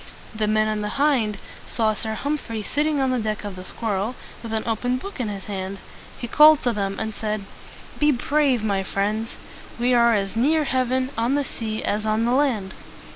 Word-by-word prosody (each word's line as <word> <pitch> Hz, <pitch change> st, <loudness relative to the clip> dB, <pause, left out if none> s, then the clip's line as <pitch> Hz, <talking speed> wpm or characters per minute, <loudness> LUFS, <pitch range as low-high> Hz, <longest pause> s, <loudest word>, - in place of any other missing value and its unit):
The 215 Hz, -1 st, -1 dB
men 215 Hz, 0 st, +2 dB
on 215 Hz, -1 st, -1 dB
the 210 Hz, +4 st, -3 dB
"Hind" 260 Hz, -8 st, +2 dB, 0.3 s
saw 220 Hz, -2 st, +1 dB
Sir 220 Hz, +1 st, -3 dB
Humphrey 245 Hz, -6 st, -3 dB
sitting 295 Hz, +5 st, 0 dB
on 265 Hz, -1 st, +2 dB
the 255 Hz, -, +1 dB
deck 215 Hz, -1 st, -2 dB
of 205 Hz, -2 st, -5 dB
the 185 Hz, -, -8 dB
"Squirrel" 215 Hz, +3 st, -2 dB, 0.3 s
with 230 Hz, -, -7 dB
an 220 Hz, -1 st, -1 dB
open 245 Hz, +3 st, 0 dB
book 395 Hz, +5 st, -8 dB
in 240 Hz, -, -1 dB
his 200 Hz, -2 st, -5 dB
hand. 195 Hz, -1 st, -4 dB, 0.4 s
He 240 Hz, -, -5 dB
called 305 Hz, +4 st, +7 dB
to 245 Hz, -, +1 dB
them 195 Hz, -2 st, -2 dB
and 220 Hz, 0 st, -3 dB
said, 210 Hz, -2 st, -3 dB, 0.5 s
"Be 295 Hz, 0 st, +4 dB
brave, 270 Hz, -2 st, +1 dB
my 200 Hz, -3 st, +1 dB
friends! 210 Hz, +4 st, -2 dB, 0.4 s
We 245 Hz, +1 st, +2 dB
are 235 Hz, -1 st, +5 dB
as 195 Hz, 0 st, -2 dB
near 300 Hz, +7 st, +3 dB
heaven 260 Hz, -1 st, 0 dB
on 240 Hz, +4 st, +2 dB
the 290 Hz, -, +1 dB
sea 220 Hz, -4 st, -4 dB
as 210 Hz, +1 st, 0 dB
on 215 Hz, +1 st, +2 dB
the 240 Hz, -, +1 dB
land." 245 Hz, -9 st, +1 dB
225 Hz, 200 wpm, -23 LUFS, 210-255 Hz, 0.5 s, called